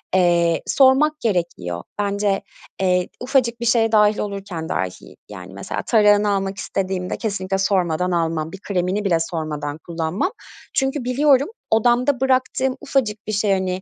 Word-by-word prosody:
Eee, 170 -2 +3
sormak 290 +3 +4
gerekiyor. 170 - -2 0.2
Bence, 200 -1 0 0.4
eee, 180 -1 +1
ufacık 245 -3 +1
bir - - -2
şeye 230 -1 +3
dâhil 210 -1 +4
olurken 195 -5 -5
dahi, 90 -1 -4
yani 95 -2 -10
mesela 100 - -5
tarağını 210 -2 +4
almak 195 -1 -1
istediğimde 185 -1 -3
kesinlikle 195 -3 -2
sormadan 180 -3 +1
almam, 165 -2 -1
bir 195 - -9
kremini 190 +1 -1
bile 175 -4 +3
sormadan 155 -3 -4
kullanmam. 170 - -2 0.4
Çünkü 270 -1 0
biliyorum 275 +2 +3 0.2
odamda 245 +4 +2
bıraktığım 260 0 +1
ufacık 215 -6 -1
bir - - -2
şey, 205 0 +1
hani, 185 -1 -1
195 Hz, 140 wpm, -21 LUFS, 175-235 Hz, 0.4 s, sormak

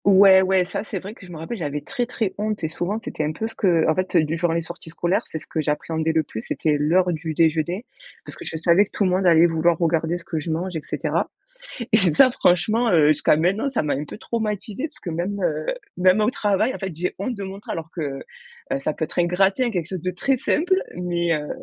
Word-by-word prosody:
Ouais, 195 -1 +7
ouais, 190 -1 +2
ça, 180 - -4
c'est 215 - -5
vrai 195 +3 -7
que 225 - -16
je - - -12
me 165 - -8
rappelle, 165 +9 -5
j'avais 150 -4 -3
très, 245 +9 -3
très 220 -5 -2
honte 215 -3 -2
et - - +1
souvent 175 +6 -3
c'était 155 - -3
un 150 +1 -1
peu 220 - -4
ce 225 - -9
que, 170 -6 +2
en 160 - +4
fait, 185 +2 -2
heu, 165 - +6
du 155 +1 -2
genre, 170 0 0
les 165 +1 0
sorties 165 0 -8
scolaires, 175 +6 0
c'est - - -5
ce - - -10
que 160 - -2
j'appréhendais 160 +2 -1
le 160 -1 +2
plus, 110 -6 -7
c'était 150 +5 0
l'heure 175 +4 +2
du 160 0 -4
déjeuner, 165 +7 +1 0.4
parce - - -7
que - - -9
je - - -5
savais 170 +5 +4
que - - -19
tout - - -1
le 185 - +2
monde 185 0 +2
allait 165 -1 +6
vouloir 165 0 +2
regarder 165 0 +1
ce 170 - -12
que 160 - -3
je 155 - -6
mange, 175 +3 -2
et 160 - -2
cetera - - -2 0.6
et - - +5
ça, 195 - +5
franchement, 220 +3 +2
heu, 155 -4 +5
jusqu'à 150 0 +3
maintenant, 190 - +1
ça 260 - -1
m'a 150 - 0
un 145 - -3
peu - - -9
traumatisée, 215 +3 -3
parce 305 - -15
que 175 - -5
même, 180 +5 -3
heu, 155 -2 -1 0.3
même 185 +3 +4
au 215 +2 +3
travail 210 +1 +1
en - - -7
fait, 190 -4 -5
j'ai 175 +3 -3
honte 220 +6 -2
de 200 - -7
montrer, 195 +1 -6
alors 165 -1 -5
que, 175 - -7 0.7
heu, - - +1
ça 135 - -2
peut 160 - -2
être - - -7
un 175 - +4
gratin, 195 +7 +2
quelque 175 -4 -2
chose 185 -3 -5
de 185 - -2
très 270 +9 +1
simple 345 +8 +1 0.2
mais, 175 -1 -1
heu, 150 -1 -3
175 Hz, 260 wpm, -23 LUFS, 160-200 Hz, 0.7 s, Ouais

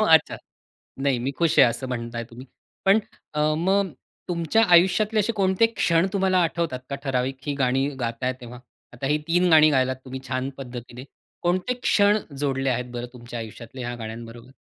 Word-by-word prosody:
अच्छा. - - +4 0.6
नाही 135 -2 +1
मी 130 +3 -2
खुश 165 -2 +2
आहे, - - +9
असं 125 +3 -4
म्हणत 120 -1 -4
आहे 115 0 -3
तुम्ही. 125 +3 -11 0.4
पण 195 +3 +6 0.4
अ, 150 - 0 0.2
मग 190 +1 +1 0.4
तुमच्या 170 +5 +2
आयुष्यातले 210 +5 +4
असे 230 +3 0
कोणते 195 +2 +3
क्षण 165 +2 +3
तुम्हाला 190 -2 +2
आठवतात 165 -6 -1
का - - -2
ठराविक 130 0 -1
ही 145 - -1
गाणी 135 0 +1
गाताय 120 +2 -1
तेव्हा? 120 0 -9 0.3
आता 125 +3 -5
ही 150 +2 +2
3 175 +2 +3
गाणी 155 -1 +7
गायलात 130 -2 +1
तुम्ही 130 0 -7
छान 130 +1 -2
पद्धतीने. 125 -1 -8 0.4
कोणते 180 +8 0
क्षण 205 +1 +4 0.2
जोडले 135 -2 0
आहेत 125 0 -1
बरं 120 0 -4
तुमच्या 120 0 -8
आयुष्यातले 115 +3 -9
ह्या 120 - -3
गाण्यांबरोबर? 115 +2 -8
135 Hz, 170 wpm, -24 LUFS, 125-175 Hz, 0.6 s, आहे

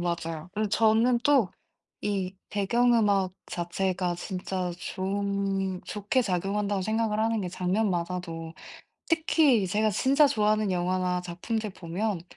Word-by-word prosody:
맞아요. 170 -2 -3
그리고 215 +1 -1
저는 225 +3 +3
또 265 -10 +4 0.6
이 190 -2 -2
배경 235 +5 +2
음악 200 -5 +2
자체가 180 +1 -1
진짜 185 0 -3
좋은 195 0 -2
좋게 210 +5 0
작용한다고 200 0 -1
생각을 220 +1 0
하는 225 0 +1
게 185 - -3
장면마다도 180 -3 -2 0.5
특히 310 - +3
제가 215 +3 +1
진짜 275 +8 +4
좋아하는 215 -4 +2
영화나 180 0 0
작품들 200 +6 -3
보면 185 +1 -3
195 Hz, 275 characters per minute, -27 LUFS, 180-220 Hz, 0.6 s, 또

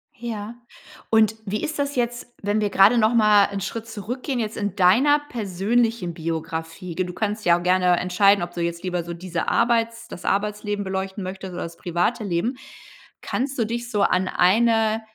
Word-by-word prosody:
Ja, 225 -1 -6 0.5
und 220 -1 +4
wie 210 +1 -3
ist 305 -1 -3
das 285 0 -1
jetzt, 240 -1 -2 0.2
wenn 205 +1 +1
wir 205 - +1
gerade 200 +5 +5
noch 220 +1 +3
mal 210 -3 +6
'n 200 -1 -4
Schritt 225 +3 -5
zurückgehen 245 +5 -4
jetzt 220 -1 -3
in 205 -3 -2
deiner 235 +11 +5
persönlichen 215 -1 0
Biografie? 165 +1 -5
G 185 - 0
du 180 - -7
kannst 215 +2 -2
dich - - -13
ja 170 - +6
auch 175 - -6
gerne 180 -1 +3
entscheiden, 190 +1 +3
ob 175 - -6
du 175 - -4
jetzt 170 +1 -3
lieber 180 -2 -2
so 170 +1 -6
diese 170 0 -4
Arbeits 230 -1 +1
das - - -9
Arbeitsleben 205 0 -1
beleuchten 190 +1 -4
möchtest 190 0 -6
oder - - -4
das 170 0 -8
private 180 +7 -1
Leben. 200 +7 -1 0.6
Kannst 265 +2 -3
du 230 - +1
dich 235 +2 -4
so 210 -4 0
an 185 -1 +2
eine 220 +4 +3
205 Hz, 190 wpm, -23 LUFS, 180-230 Hz, 0.6 s, mal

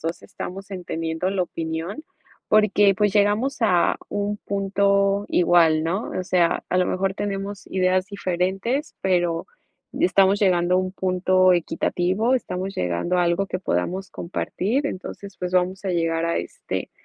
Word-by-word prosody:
2 165 +1 -4
estamos 195 +2 -8
entendiendo 165 -1 -3
la 195 -1 0
opinión, 165 - -4 0.5
porque 205 -2 +4
pues 205 -2 +2
llegamos 210 +6 +2
a 180 -6 +3
un 205 0 -2
punto 200 0 +1
igual, 165 -3 +4
¿no? 190 +7 -2
O 185 - -2
sea, 175 -2 +1
a 180 - +1
lo 180 - +3
mejor 190 +1 -1
tenemos 200 0 -4
ideas 185 0 +1
diferentes, 195 - -2
pero 175 -3 0 0.5
estamos 200 - +4
llegando 180 -2 +3
a - - +4
un 185 0 -1
punto 185 0 +2
equitativo, 185 +6 0
estamos 190 -5 -3
llegando 90 - -1
a 180 - +3
algo 175 +3 +1
que 185 -1 -4
podamos 185 - -2
compartir, 215 +9 -2
entonces, 195 -2 -8
pues 180 0 -4
vamos 185 +2 0
a 190 - -1
llegar 165 -1 0
a 170 - 0
este - - -5
185 Hz, 150 wpm, -23 LUFS, 175-200 Hz, 0.5 s, porque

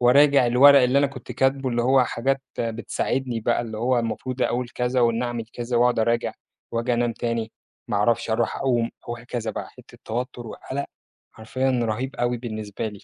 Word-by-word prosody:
وأراجع 140 +1 +5
الورق 140 +3 +7
اللي 125 +2 +4
أنا 140 - +4
كنت 125 -2 -9
كاتبه، 135 +1 +1
اللي 120 -1 0
هو 130 +1 +4
حاجات 135 +3 -1 0.2
بتساعدني 120 +1 -2
بقى 120 +2 +1
اللي 110 -2 -5
هو 125 +2 +2
المفروض 120 +2 -3
أقول 120 0 0
كذا 125 +1 -1
وإن 115 0 +2
أعمل 120 -2 -3
كذا 120 0 -3
وأقعد 120 0 +3
أراجع، 115 +1 +1 0.4
وآجي 115 +2 0
أنام 120 0 +1
تاني، 115 -1 -3 0.4
ما 105 - 0
أعرفش، 115 +2 +1
أروح 110 - 0
أقوم، 120 -4 +1 0.2
وهكذا 120 -1 -4
بقى، - - -6
حتة - - -17
توتر 120 +1 -4
وقلق، 140 +5 -5 0.5
حرفيًا 130 +4 -2
رهيب 120 +5 -2
أوي 120 -1 0
بالنسبة 110 -2 -5
لي 105 -2 -11
120 Hz, 175 wpm, -24 LUFS, 115-130 Hz, 0.5 s, الورق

